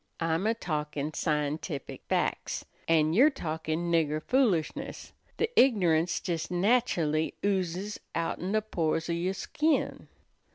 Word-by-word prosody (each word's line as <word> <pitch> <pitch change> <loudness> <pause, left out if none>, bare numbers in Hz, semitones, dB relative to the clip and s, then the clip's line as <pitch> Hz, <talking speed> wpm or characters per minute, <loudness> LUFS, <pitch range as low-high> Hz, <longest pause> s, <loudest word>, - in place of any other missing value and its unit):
"I'm 165 +4 0
a 225 - +2
talkin' 150 -6 -3
scientific 150 -1 -2
fac's, - - -1 0.2
an' 160 -1 +3
you're 260 - +6
talkin' 160 - -3
nigger 155 -2 +2
foolishness. 225 - 0 0.2
The 450 - +2
ignorance 175 - +4
jes 165 -3 -1
nachully 175 -6 +1
oozes 190 +1 -1 0.2
outen 170 +3 -2
the 215 0 +2
pores 165 -5 -1
o' - - +1
your 180 +3 -1
skin." 310 +9 0
170 Hz, 120 wpm, -29 LUFS, 155-205 Hz, 0.2 s, you're